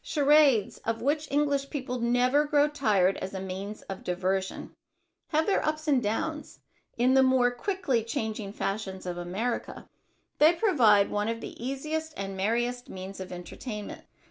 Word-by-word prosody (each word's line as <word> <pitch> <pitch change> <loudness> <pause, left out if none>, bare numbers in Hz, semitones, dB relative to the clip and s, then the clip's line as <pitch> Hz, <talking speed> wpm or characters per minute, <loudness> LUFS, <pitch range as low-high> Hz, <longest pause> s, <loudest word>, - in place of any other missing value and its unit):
Charades, 285 -7 +3
of 225 +1 -3
which 295 +2 0
English 285 -1 +1
people 255 -3 -4
never 245 +4 +3
grow 295 0 +3
tired, 210 -11 +2
as 190 +1 -6
a - - -3
means 190 +3 -6
of 195 -1 -7
diversion, 190 +1 -2 0.5
have 315 0 +1
their 400 - +1
ups 310 0 -2
and 275 -4 +3
downs 300 +9 -3 0.4
in 250 +2 +3
the 265 - +6
more 260 -2 +4
quickly 270 - -1
changing 220 -2 -3
fashions 195 -2 -4
of 175 -1 -4
America. 200 +8 -3 0.5
They 310 +3 +7
provide 245 - +4
one 205 +1 0
of 230 0 -2
the - - -7
easiest 310 +4 -3
and 195 0 -4
merriest 240 +5 -1
means 190 +1 -8
of 185 -1 -7
entertainment. 205 +5 -7
240 Hz, 155 wpm, -28 LUFS, 200-290 Hz, 0.5 s, They